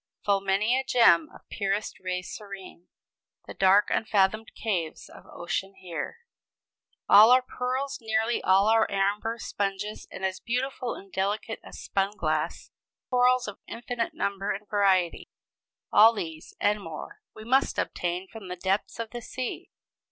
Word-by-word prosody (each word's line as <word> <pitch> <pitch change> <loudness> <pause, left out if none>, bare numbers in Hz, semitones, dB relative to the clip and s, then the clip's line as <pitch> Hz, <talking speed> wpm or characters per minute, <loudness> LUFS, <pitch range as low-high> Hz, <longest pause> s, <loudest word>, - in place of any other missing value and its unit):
"Full 200 -1 +2
many 195 +5 +2
a - - -2
gem 230 -11 +5
of - - -17
purest 200 +1 -2
ray 180 -1 -3
serene, 195 -3 -10 0.6
The - - -8
dark 195 +2 +4
unfathomed 215 +1 +1
caves 175 -8 -3
of - - -15
ocean 195 +3 -4
bear." 185 - -6 0.9
All 215 +3 +9
our 255 +1 +6
pearls, 255 +2 -3
nearly 220 +1 0
all 195 +2 +4
our 225 0 +4
amber, 205 +3 0
sponges, 205 -1 -4
and 190 - -5
as 190 0 -2
beautiful 250 +1 -2
and 195 0 -13
delicate 205 +3 -2
as - - -11
spun 200 +1 -1
glass, 155 -1 -2 0.4
corals 250 0 +3
of 205 - -7
infinite 235 0 -4
number 200 0 -2
and 205 +1 -3
variety 190 -4 +1 0.6
all 225 +2 +8
these, 160 -7 -7
and 210 0 +1
more, 165 -4 -8
we 215 - -10
must 260 +4 +2
obtain 180 +2 -2
from 215 -1 -10
the 180 - -5
depths 190 +3 -1
of 230 -1 -5
the 240 - -6
sea. 255 +2 -5
205 Hz, 150 wpm, -27 LUFS, 190-230 Hz, 0.9 s, All